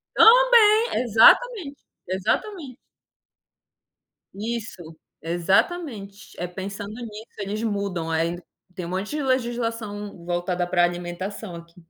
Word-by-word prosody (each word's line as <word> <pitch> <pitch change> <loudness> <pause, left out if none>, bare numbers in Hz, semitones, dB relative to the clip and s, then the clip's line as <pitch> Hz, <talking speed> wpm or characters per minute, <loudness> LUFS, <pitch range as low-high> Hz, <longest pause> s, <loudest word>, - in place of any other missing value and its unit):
Também, 465 -1 +6
exatamente, 285 - +4 0.3
exatamente. 260 - -2 1.6
Isso, 205 -6 -6 0.2
exatamente. 200 - -1
É 180 - -3
pensando 200 +3 -7
nisso 220 -3 -8
eles 205 +1 -4
mudam, 200 -6 -2
aí 165 +2 -1 0.3
tem 180 -2 -6
um - - -6
monte 190 +3 -3
de 300 0 -2
legislação 230 -7 -3
voltada 175 0 -1
pra 175 0 +2
alimentação 175 +3 -4
aqui, 170 0 -13
205 Hz, 100 wpm, -24 LUFS, 175-245 Hz, 1.6 s, Também